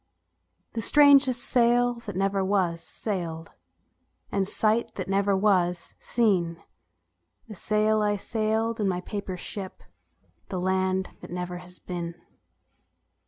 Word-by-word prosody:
The 225 Hz, -, -2 dB
strangest 275 Hz, -1 st, +5 dB
sail 245 Hz, 0 st, +3 dB
that 205 Hz, -, -5 dB
never 195 Hz, +1 st, +1 dB
was 185 Hz, -4 st, +1 dB
sailed, 165 Hz, -7 st, -4 dB, 0.8 s
And 195 Hz, -1 st, 0 dB
sight 220 Hz, +3 st, +1 dB
that 185 Hz, -, -4 dB
never 195 Hz, 0 st, +2 dB
was 180 Hz, -4 st, +1 dB
seen 180 Hz, -8 st, +1 dB, 0.8 s
The 220 Hz, -, -8 dB
sail 215 Hz, +2 st, +1 dB
I 205 Hz, 0 st, +2 dB
sailed 220 Hz, +2 st, -1 dB
in 205 Hz, -, +1 dB
my 180 Hz, -1 st, -1 dB
paper 200 Hz, -1 st, -5 dB
ship, 190 Hz, +1 st, -7 dB, 0.7 s
The 185 Hz, -, -3 dB
land 190 Hz, +1 st, 0 dB
that -, -, -11 dB
never 180 Hz, 0 st, -4 dB
has 180 Hz, 0 st, -14 dB
been. 170 Hz, -2 st, -5 dB
195 Hz, 120 wpm, -26 LUFS, 180-220 Hz, 0.8 s, strangest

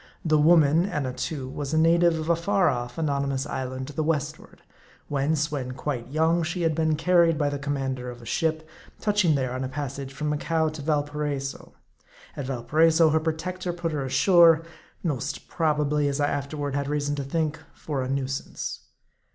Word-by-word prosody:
The 155 Hz, -1 st, +3 dB
woman, 160 Hz, +2 st, +5 dB
Annatoo, 140 Hz, -3 st, -3 dB
was 145 Hz, +3 st, -4 dB
a -, -, +3 dB
native 170 Hz, +1 st, +4 dB
of 155 Hz, 0 st, -4 dB
a 170 Hz, -, +4 dB
far 185 Hz, +1 st, +2 dB
off, 120 Hz, -1 st, -3 dB
anony 140 Hz, -3 st, 0 dB
mous 135 Hz, 0 st, -1 dB
island 130 Hz, 0 st, -4 dB
to 145 Hz, -, -9 dB
the 155 Hz, -, -1 dB
westward: 150 Hz, -1 st, -3 dB, 0.5 s
whence, 145 Hz, +2 st, 0 dB
when 130 Hz, -4 st, -3 dB
quite 130 Hz, -3 st, -4 dB
young, 160 Hz, +4 st, +2 dB
she 175 Hz, +2 st, -2 dB
had 165 Hz, -1 st, +2 dB
been 160 Hz, 0 st, +1 dB
carried 170 Hz, 0 st, +3 dB
by 145 Hz, -1 st, +1 dB
the 145 Hz, -, -3 dB
commander 135 Hz, -3 st, -3 dB
of 120 Hz, 0 st, -9 dB
a 120 Hz, -, -13 dB
ship, 160 Hz, +4 st, -1 dB, 0.3 s
touching 205 Hz, -7 st, +2 dB
there 130 Hz, -2 st, -1 dB
on 130 Hz, +1 st, -3 dB
a 130 Hz, -, -3 dB
passage 140 Hz, -1 st, -5 dB
from 150 Hz, +2 st, -3 dB
Macao 160 Hz, +2 st, 0 dB
to 155 Hz, -1 st, -8 dB
Valparaiso. 145 Hz, -2 st, -2 dB, 0.6 s
At 140 Hz, -, -5 dB
Valpa 125 Hz, -3 st, -5 dB
raiso 165 Hz, 0 st, +6 dB
her 160 Hz, -, +3 dB
protector 175 Hz, +3 st, -3 dB
put 170 Hz, -1 st, -3 dB
her 145 Hz, -3 st, -2 dB
ashore; 165 Hz, +4 st, +5 dB, 0.4 s
most 145 Hz, -3 st, -3 dB
probably, 150 Hz, -2 st, +1 dB
as 140 Hz, 0 st, -1 dB
I 145 Hz, 0 st, +2 dB
after 140 Hz, +2 st, -3 dB
ward 145 Hz, -1 st, -2 dB
had 140 Hz, 0 st, -1 dB
reason 145 Hz, 0 st, -1 dB
to 140 Hz, -, -2 dB
think, 155 Hz, +2 st, -1 dB, 0.2 s
for 145 Hz, -4 st, -3 dB
a 130 Hz, -, -3 dB
nuisance. 135 Hz, 0 st, -3 dB
150 Hz, 185 wpm, -26 LUFS, 140-160 Hz, 0.6 s, raiso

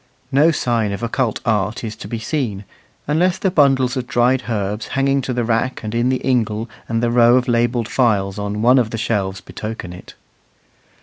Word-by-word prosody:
No 145 Hz, +4 st, +5 dB
sign 115 Hz, -8 st, 0 dB
of 100 Hz, -, -6 dB
occult 115 Hz, -1 st, -1 dB
art 105 Hz, -1 st, 0 dB
is 110 Hz, -1 st, -5 dB
to -, -, -8 dB
be 115 Hz, -, -4 dB
seen, 110 Hz, -4 st, -3 dB, 0.4 s
unless 175 Hz, +5 st, +2 dB
the 190 Hz, -, 0 dB
bundles 135 Hz, -6 st, +3 dB
of 125 Hz, -2 st, -3 dB
dried 125 Hz, 0 st, +2 dB
herbs 105 Hz, -1 st, -2 dB
hanging 135 Hz, 0 st, +2 dB
to 130 Hz, -, -4 dB
the 120 Hz, -1 st, -1 dB
rack 115 Hz, +3 st, -1 dB
and 110 Hz, 0 st, -4 dB
in 120 Hz, +2 st, +1 dB
the 130 Hz, -1 st, -1 dB
ingle 115 Hz, -3 st, 0 dB, 0.2 s
and 115 Hz, +1 st, 0 dB
the 120 Hz, -, +1 dB
row 120 Hz, 0 st, +5 dB
of 130 Hz, 0 st, +1 dB
labelled 120 Hz, -1 st, +1 dB
phials 105 Hz, -7 st, +1 dB
on 105 Hz, +1 st, -3 dB
one 125 Hz, +2 st, +6 dB
of 115 Hz, -3 st, 0 dB
the 115 Hz, -, -4 dB
shelves 100 Hz, -4 st, -2 dB
betoken 105 Hz, -5 st, -7 dB
it. 90 Hz, -, -12 dB
120 Hz, 195 wpm, -19 LUFS, 110-130 Hz, 0.4 s, one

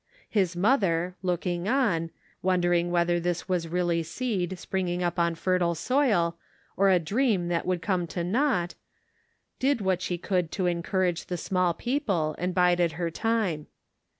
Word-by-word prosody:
His 185 Hz, -5 st, +1 dB
mother, 180 Hz, -4 st, +2 dB
looking 180 Hz, 0 st, -1 dB
on, 210 Hz, -11 st, +1 dB, 0.3 s
wondering 175 Hz, -2 st, +2 dB
whether 175 Hz, 0 st, +2 dB
this 175 Hz, +1 st, -2 dB
was 180 Hz, -3 st, 0 dB
really 175 Hz, 0 st, 0 dB
seed, 190 Hz, 0 st, -2 dB
spring 190 Hz, +1 st, -2 dB
ing 175 Hz, +1 st, -1 dB
up 175 Hz, 0 st, -1 dB
on 170 Hz, -1 st, +2 dB
fertile 175 Hz, 0 st, +1 dB
soil, 205 Hz, -, +1 dB, 0.4 s
or 195 Hz, 0 st, +4 dB
a 185 Hz, -, +5 dB
dream 195 Hz, -, +1 dB
that 170 Hz, 0 st, -1 dB
would 180 Hz, -2 st, -1 dB
come 180 Hz, -2 st, 0 dB
to 170 Hz, +2 st, -3 dB
naught, 185 Hz, -3 st, +1 dB, 0.9 s
did 270 Hz, -1 st, +2 dB
what 190 Hz, -3 st, 0 dB
she 180 Hz, -1 st, -2 dB
could 180 Hz, -2 st, -1 dB
to 190 Hz, -, -1 dB
encour 180 Hz, +2 st, +1 dB
age 175 Hz, -1 st, -3 dB
the 180 Hz, -, -3 dB
small 180 Hz, -1 st, 0 dB
people, 205 Hz, -, -1 dB
and 180 Hz, +1 st, -2 dB
bided 175 Hz, -2 st, +3 dB
her 170 Hz, 0 st, -2 dB
time. 210 Hz, -7 st, -1 dB
180 Hz, 160 wpm, -27 LUFS, 170-190 Hz, 0.9 s, a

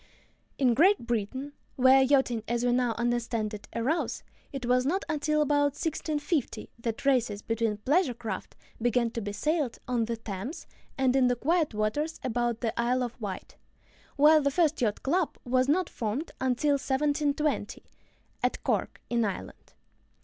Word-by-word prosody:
In 255 Hz, -3 st, +3 dB
Great 345 Hz, -, +4 dB
Britain, 240 Hz, +5 st, -3 dB, 0.2 s
where 260 Hz, +1 st, +6 dB
yachting, 265 Hz, -4 st, +2 dB
as 240 Hz, +1 st, 0 dB
we 245 Hz, -, +3 dB
now 245 Hz, -2 st, +1 dB
understand 235 Hz, -2 st, -1 dB
it, 210 Hz, -, -8 dB
arose, 270 Hz, +9 st, -1 dB, 0.3 s
it 270 Hz, -3 st, -5 dB
was 250 Hz, +1 st, +3 dB
not 355 Hz, +9 st, 0 dB
until 305 Hz, 0 st, +1 dB
about 290 Hz, -1 st, +1 dB
1650 305 Hz, -2 st, -2 dB
that 230 Hz, +2 st, -4 dB
races 240 Hz, -7 st, +1 dB
between 225 Hz, -2 st, -1 dB
pleasure 275 Hz, -, +1 dB
craft 230 Hz, -2 st, -6 dB, 0.3 s
began 240 Hz, 0 st, +1 dB
to 230 Hz, -, -4 dB
be 205 Hz, 0 st, -4 dB
sailed 295 Hz, +4 st, -1 dB
on 240 Hz, -2 st, +1 dB
the 230 Hz, 0 st, -3 dB
Thames 225 Hz, -, -6 dB, 0.3 s
and 260 Hz, -1 st, +2 dB
in 260 Hz, -2 st, +4 dB
the 245 Hz, -, +2 dB
quiet 310 Hz, 0 st, +1 dB
waters 255 Hz, +10 st, -1 dB
about 240 Hz, -1 st, -1 dB
the 230 Hz, -3 st, -1 dB
Isle 250 Hz, +2 st, +1 dB
of 245 Hz, 0 st, -6 dB
Wight, 195 Hz, -3 st, -6 dB, 0.6 s
while 305 Hz, +2 st, +6 dB
the 280 Hz, -, +2 dB
first 315 Hz, 0 st, +1 dB
yacht 215 Hz, -4 st, 0 dB
club 335 Hz, +4 st, 0 dB
was 255 Hz, +2 st, +2 dB
not 355 Hz, +3 st, +2 dB
formed 235 Hz, +7 st, -3 dB
until 260 Hz, +3 st, +2 dB
1720 285 Hz, -2 st, 0 dB, 0.6 s
(at -, -, -1 dB
Cork, -, -, -1 dB
in 235 Hz, -1 st, +2 dB
Ireland). 200 Hz, -3 st, -6 dB
255 Hz, 155 wpm, -28 LUFS, 230-290 Hz, 0.6 s, where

